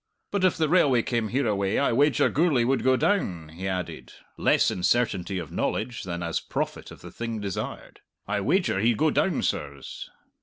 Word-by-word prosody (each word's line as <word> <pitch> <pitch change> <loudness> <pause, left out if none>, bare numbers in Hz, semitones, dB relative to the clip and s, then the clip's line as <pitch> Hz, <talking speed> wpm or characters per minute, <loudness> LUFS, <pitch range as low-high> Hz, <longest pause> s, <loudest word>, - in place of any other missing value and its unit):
But 200 -2 0
if 185 - +3
the 160 - +2
railway 145 -8 +4
came 120 -4 -1
hereaway 105 -5 0
I 140 - +2
wager 145 +4 +3
Gourlay 150 -5 +2
would 135 +2 +1
go 130 0 +4
down," 95 - 0
he 90 +4 -6
added, 90 -2 -4 0.2
less - - +3
in 90 - -4
certainty 100 -3 +1
of 85 -5 -6
knowledge 120 +1 -2
than 85 -2 -4
as 85 -1 -1
prophet - - -4
of - - -13
the - - -10
thing 115 -1 -4
desired. 100 -3 -5 0.3
"I 105 0 -1
wager 145 - +1
he'd 115 +2 +2
go 155 +4 +3
down, 190 - +1
sirs." - - -4
115 Hz, 185 wpm, -26 LUFS, 95-145 Hz, 0.3 s, railway